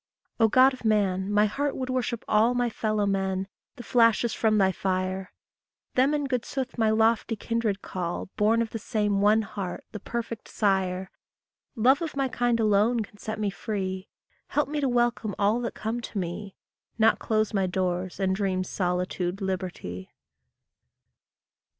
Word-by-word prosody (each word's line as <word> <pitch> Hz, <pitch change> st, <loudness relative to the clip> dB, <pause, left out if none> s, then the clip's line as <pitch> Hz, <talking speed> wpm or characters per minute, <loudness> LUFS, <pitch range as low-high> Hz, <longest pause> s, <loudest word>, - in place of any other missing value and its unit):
O 225 Hz, -, +6 dB
God 255 Hz, +4 st, +5 dB
of 255 Hz, -, -10 dB
man, 200 Hz, -3 st, +1 dB
my 210 Hz, +1 st, +4 dB
heart 280 Hz, +7 st, -1 dB
would 255 Hz, -1 st, -3 dB
worship 245 Hz, -2 st, -2 dB
all 220 Hz, +3 st, +3 dB
My 245 Hz, -1 st, +1 dB
fellow 215 Hz, -2 st, 0 dB
men, 190 Hz, -1 st, -1 dB, 0.3 s
the 245 Hz, -, -9 dB
flashes 230 Hz, -1 st, +3 dB
from 215 Hz, -1 st, +2 dB
thy 190 Hz, -2 st, +4 dB
fire; 185 Hz, 0 st, -2 dB, 0.6 s
Them 270 Hz, +4 st, +3 dB
in 290 Hz, -1 st, -1 dB
good 250 Hz, -3 st, -1 dB
sooth 260 Hz, -1 st, -4 dB
my 225 Hz, -2 st, +2 dB
lofty 225 Hz, +1 st, +2 dB
kindred 220 Hz, -2 st, -2 dB
call, 175 Hz, -2 st, -3 dB
Born 225 Hz, +2 st, +3 dB
of 225 Hz, -, -7 dB
the 225 Hz, -, -4 dB
same 205 Hz, -2 st, 0 dB
one 215 Hz, +2 st, +4 dB
heart, 195 Hz, -3 st, -5 dB
the 215 Hz, -, -6 dB
perfect 230 Hz, +1 st, -5 dB
sire; 190 Hz, -2 st, 0 dB, 0.6 s
Love 260 Hz, +6 st, +4 dB
of 320 Hz, -3 st, -4 dB
my 275 Hz, -1 st, +1 dB
kind 240 Hz, -1 st, +1 dB
alone 220 Hz, +2 st, +3 dB
can 205 Hz, -1 st, -9 dB
set 220 Hz, 0 st, -4 dB
me 205 Hz, -2 st, 0 dB
free; 190 Hz, -3 st, -4 dB, 0.4 s
Help 295 Hz, -, 0 dB
me 295 Hz, +1 st, -2 dB
to 275 Hz, -, +1 dB
welcome 240 Hz, -3 st, +1 dB
all 210 Hz, +3 st, +2 dB
that 235 Hz, -, -4 dB
come 225 Hz, +2 st, -3 dB
to 225 Hz, -, -7 dB
me, 190 Hz, +2 st, -4 dB, 0.4 s
Not 225 Hz, 0 st, +4 dB
close 215 Hz, 0 st, 0 dB
my 195 Hz, -2 st, +1 dB
doors 180 Hz, 0 st, -2 dB
and 190 Hz, -1 st, +1 dB
dream 190 Hz, -2 st, 0 dB
solitude 180 Hz, 0 st, -2 dB
liberty! 180 Hz, -, -4 dB
215 Hz, 165 wpm, -27 LUFS, 190-235 Hz, 0.6 s, O